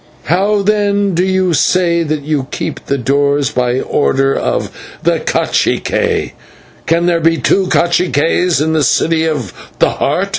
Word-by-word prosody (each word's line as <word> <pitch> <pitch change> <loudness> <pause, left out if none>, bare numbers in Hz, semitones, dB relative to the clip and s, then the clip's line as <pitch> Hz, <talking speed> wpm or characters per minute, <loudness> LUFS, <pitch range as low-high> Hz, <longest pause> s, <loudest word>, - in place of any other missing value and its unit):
"How, 200 +6 +1
then, 205 -1 +1
do 175 +2 +1
you 185 -2 +1
say 170 +1 +2
that 155 -2 -2
you 145 -3 -2
keep - - -5
the 140 - 0
doors 140 +2 +1
by 125 0 0
order 135 -1 +1
of - - -2 0.3
the - - +1
/cacique/? - - -1 0.6
Can 170 +1 +2
there 175 -1 +2
be 165 +1 +2
two 190 +3 +1
/caciques/ 170 -2 +1
in 160 +2 0
the 155 -2 +1
City 160 +3 +1
of 140 - -3 0.2
the - - +2
Heart?" - - -1
165 Hz, 150 wpm, -14 LUFS, 145-180 Hz, 0.6 s, say